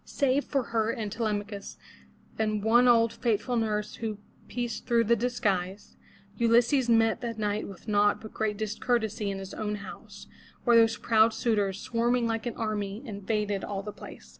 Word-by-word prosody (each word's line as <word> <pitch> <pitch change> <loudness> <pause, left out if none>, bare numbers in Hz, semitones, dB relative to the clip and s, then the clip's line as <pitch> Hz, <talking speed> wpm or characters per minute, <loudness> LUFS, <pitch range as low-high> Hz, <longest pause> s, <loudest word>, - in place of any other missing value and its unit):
Save 275 0 0
for 275 -3 0
her 220 -1 +2
and 225 -4 -3
for 225 - -11
Telemachus 205 -2 -3 0.6
and 215 -2 0
one 240 +3 +5
old 230 -2 +5
faithful 240 +1 0
nurse 210 -2 -1
who 220 -2 -4 0.3
pierced 240 -2 -4
through 235 -2 +3
his 235 +2 +3
disguise, 200 -5 -1 0.4
Ulysses 240 +2 +3
met 225 -1 +3
that 230 -2 -4
night 210 0 -1
with 195 +2 -12
naught 205 -1 +3
but 220 - -11
great 215 -2 -1
discourtesy 220 0 -1
in 195 - -3
his 195 0 -8
own 210 -1 -3
house, 200 -2 -10 0.4
where 240 -1 +4
those 225 -1 +5
proud 220 0 +3
suitors, 205 -4 0
swarming 240 0 +1
like 225 +1 -2
an 240 - -4
army, 210 0 -3
invaded 205 -1 -2
all 200 -1 -4
the 210 0 -6
place. - - -12
220 Hz, 170 wpm, -28 LUFS, 205-235 Hz, 0.6 s, one